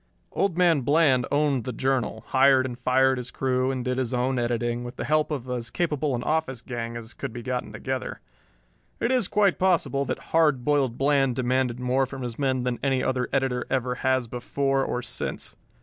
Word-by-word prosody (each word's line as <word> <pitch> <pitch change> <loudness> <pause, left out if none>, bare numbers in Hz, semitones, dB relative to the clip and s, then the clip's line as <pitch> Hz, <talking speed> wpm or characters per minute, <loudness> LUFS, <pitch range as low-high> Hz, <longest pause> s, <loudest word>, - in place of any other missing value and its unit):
Old 190 -4 0
Man 170 -5 +4
Bland 140 -2 +3
owned 145 -4 +2
the 125 - -4
Journal, 125 -3 -1
hired 130 0 +5
and 125 -2 -4
fired 130 +1 +3
his 125 0 -6
crew 130 0 0
and 130 -2 -3
did 125 0 -1
his 125 -1 -1
own 125 +1 0
editing, 120 0 -1
with 120 +1 -7
the - - -4
help 155 0 +2
of 135 -5 -4
as 120 -2 -3
capable 150 -5 -1
an 120 - -3
office 145 -5 -1
gang 115 -1 -5
as 115 0 -9
could - - -5
be 120 +1 -7
gotten 125 0 -3
together. 130 -1 -4 0.8
It 235 - 0
is 255 -2 +2
quite 205 -2 +2
possible 170 -7 +2
that - - -5
"Hard 150 -6 +3
Boiled" 140 -5 +1
Bland 135 -2 +2
demanded 125 -1 0
more 130 +1 +1
from 135 -1 -7
his 120 0 -5
men 130 -3 +1
than 125 -1 -2
any 135 -2 +1
other 125 -1 -1
editor 130 -2 0
ever 130 -1 0
has 130 -1 +2
before 135 +3 -1
or 125 -1 -2
since. 115 - -4
130 Hz, 195 wpm, -25 LUFS, 125-140 Hz, 0.8 s, hired